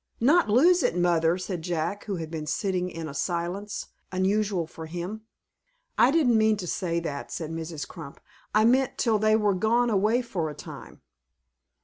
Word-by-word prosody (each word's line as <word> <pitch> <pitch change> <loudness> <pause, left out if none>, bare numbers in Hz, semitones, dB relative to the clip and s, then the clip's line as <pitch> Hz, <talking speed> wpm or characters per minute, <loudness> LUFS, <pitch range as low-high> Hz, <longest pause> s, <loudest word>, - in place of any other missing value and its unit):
"Not 295 +4 +4
lose 335 +11 +5
it, 175 - +1
mother," 170 -1 +2
said 185 -2 -4
Jack, 170 +3 -3
who 200 - -3
had 165 -2 -6
been 155 -2 -5
sitting 180 +5 -1
in 165 -2 -6
a 140 - -7
silence 175 +7 -3 0.2
unusual 190 -1 0
for 160 0 -9
him. 180 +7 -6 0.7
"I 245 - +5
didn't 270 -7 +3
mean 220 0 +3
to 190 - -5
say 170 -1 -1
that," 145 -4 -5
said 160 -2 -4
Mrs. 160 -3 -5
Crump. 155 -5 -10 0.3
"I 215 +1 +4
meant 255 +2 +2
till 225 -3 +2
they 215 +1 +4
were 210 -2 +2
gone 230 +5 +2
away 215 +5 +2
for 175 -9 -3
a 150 - -8
time." - - -11
185 Hz, 175 wpm, -26 LUFS, 165-220 Hz, 0.7 s, lose